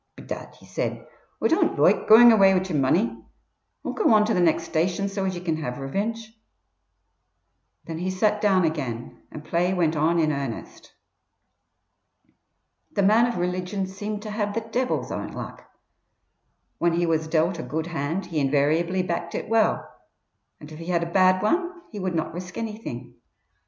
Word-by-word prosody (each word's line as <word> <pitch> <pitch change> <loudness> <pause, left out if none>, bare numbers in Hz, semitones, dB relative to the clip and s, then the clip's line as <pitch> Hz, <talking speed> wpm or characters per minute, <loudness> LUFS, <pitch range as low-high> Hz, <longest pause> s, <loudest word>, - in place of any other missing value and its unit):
"Bedad," - - -8
he - - -18
said, - - -4 0.4
"Oi - - +5
don't - - +2
loike - - +3
goin' 235 +2 +9
away 195 -3 +6
wid 185 +1 0
yer 175 - -3
money. 115 -4 +1 0.6
Oi'll - - -2
go 430 - +2
on 210 0 +5
to 225 - 0
the 185 - +1
next 170 -2 +2
station 180 +5 0
so 195 -1 -3
as 190 -1 -1
ye 175 - -6
can 165 -3 -1
have 125 -6 -4
revinge." 220 +11 -4 1.5
Then 165 -1 -5
he 180 +2 -2
sat 210 +3 +1
down 190 -4 +3
again, 130 -8 -4
and 155 0 -9
play 180 +2 0
went 165 -3 +1
on 160 +3 +2
in 155 -2 +2
earnest. 140 -5 -6 2.0
The 200 - +1
man 220 +4 +5
of 240 - -3
religion 180 +2 -2
seemed 205 +2 -5
to 215 - -6
have 210 -1 -2
the 230 - 0
Devil's 245 +3 -2
own - - -5
luck. - - -8 1.1
When 170 0 +2
he 175 +1 +1
was 160 -1 0
dealt 165 +2 +1
a - - -2
good 160 +1 -3
hand 165 +2 -3
he 165 -3 -2
invariably 155 +6 +1
backed 170 -1 -3
it - - -4
well, 225 -1 +2 0.7
and 150 +1 -12
if 155 - -10
he 165 - -8
had 170 -2 +1
a 170 - -5
bad 185 0 +4
one 350 - +1 0.2
he 210 - -6
would 185 -2 -2
not 160 -1 -2
risk 180 +1 -7
anything. 215 - -6
180 Hz, 175 wpm, -24 LUFS, 160-205 Hz, 2.0 s, goin